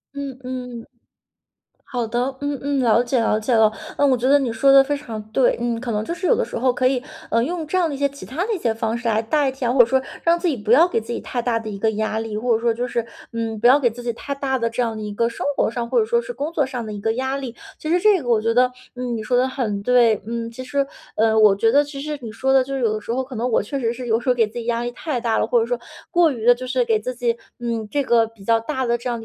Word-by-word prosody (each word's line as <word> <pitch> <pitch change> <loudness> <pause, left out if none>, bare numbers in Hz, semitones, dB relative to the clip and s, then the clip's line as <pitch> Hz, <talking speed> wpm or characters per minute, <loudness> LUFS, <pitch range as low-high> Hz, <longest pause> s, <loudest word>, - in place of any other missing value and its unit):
嗯 275 -2 -5
嗯。 250 -2 -6 1.0
好 245 -4 -3
的， 250 +4 -2
嗯 285 0 -2
嗯， 285 0 0
了 235 -1 +4
解 245 +1 0
了 225 -1 +2
解 220 +3 -1
了， 220 -1 +5 0.3
嗯， 285 -1 +4
我 260 - +4
觉 245 0 -3
得 285 +1 +6
你 265 -4 -1
说 250 +5 +3
得 275 - +9
非 285 +2 -1
常 230 -7 -6
对。 260 0 +3
嗯， 235 -1 -1
可 245 -2 -3
能 210 0 -1
就 335 - -3
是 345 +2 -5
有 - - +5
的 - - 0
时 - - -6
候 255 +1 +2
可 255 +1 +2
以， 255 -1 0 0.3
呃， 230 0 +2
用 325 +3 -3
这 370 - 0
样 350 -3 +2
的 - - -4
一 275 - -4
些 280 - +2
其 280 +1 -11
它 325 +8 -3
的 455 - -1
一 - - -3
些 235 -9 0
方 225 +1 -2
式 235 -1 -2
来 220 0 +2
代 275 +4 +1
替 265 -1 -5
啊， 240 - +1
或 265 - 0
者 240 - +6
说 265 +2 +1 0.2
让 340 0 +3
自 355 - -1
己 300 - +1
不 215 -1 -3
要 320 +8 +7
给 230 - -1
自 225 - -15
己 - - -2
太 245 - -3
大 235 -1 0
的 220 - -6
一 200 - -5
个 220 +2 +1
压 220 0 -2
力。 220 -1 -3
或 235 +1 +1
者 225 - -2
说 235 -1 +2
就 245 +2 -3
是， 235 -1 -2 0.3
嗯， 225 -2 -3
不 240 - +4
要 260 +3 +7
给 265 -5 +2
自 235 +2 -9
己 240 -1 -2
太 280 +5 -5
大 275 -1 -1
的 230 -2 0
这 230 +2 -2
样 230 -2 -1
的 215 - -6
一 210 -1 -5
个 230 +3 +1
生 230 - -5
活 - - +2
上， 235 0 -4
或 465 - +3
者 435 - +2
说 470 +1 +1
是 - - -7
工 320 -8 -4
作 295 -4 +2
上 250 -3 -5
的 215 - -6
一 205 - -7
个 225 +2 +1
压 265 +2 -1
力， 265 -4 -5 0.2
其 310 - -6
实 355 +2 +3
这 405 -4 +4
个 245 - -5
我 225 -2 +3
觉 230 +1 +1
得， 250 +1 +4 0.2
嗯， 250 -2 -3
你 220 - -4
说 245 +3 -1
得 255 - +3
很 215 -7 -3
对。 235 -3 +4
嗯， 230 0 -4
其 245 +3 -8
实， 275 +2 -1 0.3
呃， 220 0 +3
我 215 -2 +7
觉 225 +3 +2
得 290 - +5
其 285 -1 -8
实 300 +1 -4
你 230 - -7
说 265 +4 0
的 265 -1 +5
就 275 +1 -6
是 270 - -1
有 225 -3 +2
的 215 - -4
时 220 +3 -4
候 260 - 0
可 260 -1 -8
能 240 +3 -1
我 - - +3
确 245 +7 -4
实 235 -4 0
是 245 +1 -6
有 225 -1 +3
时 240 - -3
候 250 - +4
给 225 -3 +3
自 215 - -17
己 235 -1 -5
压 235 0 0
力 240 - -2
太 265 0 -3
大 230 -1 0
了， - - +2
或 485 - +2
者 455 - +1
说 - - -1 0.3
过 345 -3 +4
于 230 -4 -5
地 245 0 +7
就 255 +1 -7
是 465 - 0
给 450 -2 +2
自 255 - -4
己， 235 -1 -1 0.2
嗯， 230 -2 -2
这 290 - +1
个 235 -4 +3
比 220 -3 -17
较 225 0 +3
大 260 +1 -2
的 235 0 +1
这 245 +1 -5
样 235 - -2
的 225 - -9
245 Hz, 350 characters per minute, -21 LUFS, 230-275 Hz, 1.0 s, 得